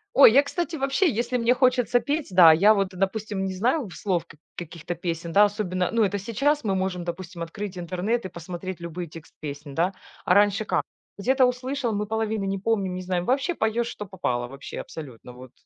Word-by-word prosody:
Ой, 250 -5 +9
я, 280 - +7
кстати, 340 +3 -3
вообще, 275 +5 +2
если 240 +1 -1
мне 235 +1 +3
хочется 250 -1 +3
петь, 295 +1 -2
да, 180 -3 +8
я 200 +7 +6
вот, 195 -2 0
допустим, 195 +1 -2
не 190 - -3
знаю 245 - +1
в 175 - -11
слов 180 -5 -1
как 155 - -17 0.2
каких-то 170 0 -6
песен, 170 -1 -4
да, 205 +4 +6
особенно, 185 -3 -1
ну, 230 -1 +3
это 205 0 0
сейчас 275 +7 0
мы 195 -2 +1
можем, 185 -2 -2
допустим, 175 0 -6
открыть 185 +3 -6
интернет 185 +7 -2
и - - -4
посмотреть 175 +1 -7
любые 170 +1 -5
тексты 160 +1 -13
песен, 145 -1 -7
да. 175 +5 +1 0.3
А 180 - +4
раньше 205 +2 +3
как? - - 0 0.3
Где-то 260 +5 +3
услышал, 250 0 -1
мы 210 0 -1
половины 220 -2 -1
не 195 0 -1
помним, 195 -4 0
не 185 - -4
знаем, 180 -1 -2
вообще 275 - +1
поёшь, 230 0 0
что 210 - -6
попало, 125 -11 -2
вообще, 135 +2 -8
абсолютно 130 -6 -10
вот. 125 0 -12
195 Hz, 205 wpm, -25 LUFS, 175-235 Hz, 0.3 s, Ой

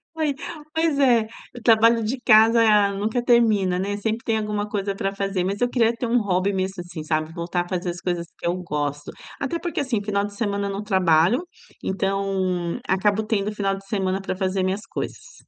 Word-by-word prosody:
Foi, 310 -3 0 0.4
pois 320 -3 +1
é, 245 -5 +4 0.3
o - - -8
trabalho 230 0 +5
de 230 +5 -2
casa 225 0 +6 0.3
nunca 220 +5 -1
termina, 215 -7 +3
né, 200 +2 -2
sempre 220 +2 -2
tem 225 -1 0
alguma 210 -1 -2
coisa 200 -1 -2
pra 195 0 -2
fazer. 195 -2 -1
Mas 195 +2 -2
eu 245 - +2
queria 235 -2 +2
ter 235 +1 -3
um 235 0 +2
hobby 195 0 0
mesmo, 190 0 -2
assim, 175 -3 -7
sabe, 155 0 -1
voltar 175 0 -2
a - - -13
fazer 180 -1 -2
as 175 0 -5
coisas 175 -1 -2
que - - -4
eu 175 - +1
gosto. 145 -2 -3 0.3
Até 280 +5 -2
porque, 345 -4 -2
assim, 240 -7 -1
final 200 -1 -1
de 205 - -8
semana 200 -1 -2
eu - - -3
não 200 +2 -4
trabalho, 190 - +3 0.4
então 190 -3 -1
acabo 205 +3 +2
tendo 210 -1 -1
final 195 -2 -1
de 195 - -13
semana 195 -2 -1
pra 190 - -4
fazer 190 -1 0
minhas 195 +4 -2
coisas. - - -6
200 Hz, 200 wpm, -23 LUFS, 185-225 Hz, 0.4 s, casa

